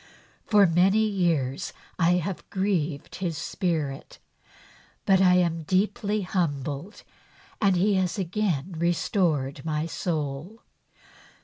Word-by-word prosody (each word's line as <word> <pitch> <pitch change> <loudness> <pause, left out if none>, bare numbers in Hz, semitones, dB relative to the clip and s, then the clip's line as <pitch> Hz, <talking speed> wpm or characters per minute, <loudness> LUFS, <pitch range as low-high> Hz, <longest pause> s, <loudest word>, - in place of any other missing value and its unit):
For 205 -2 +6
many 190 +5 +3
years 170 -10 0 0.3
I 175 0 +4
have 180 +1 -3
grieved 175 -7 -2
His 170 -5 -3
Spirit, 155 -6 -3 0.9
but 195 -2 +4
I 180 -1 +6
am 170 -2 +1
deeply 205 +5 0
humbled 155 - -3 0.6
and 195 -3 +4
He 200 +4 +3
has 185 0 0
again 190 -4 -1
restored 165 -5 0
my 155 -1 -1
soul. 160 +4 -4
175 Hz, 105 wpm, -26 LUFS, 155-195 Hz, 0.9 s, For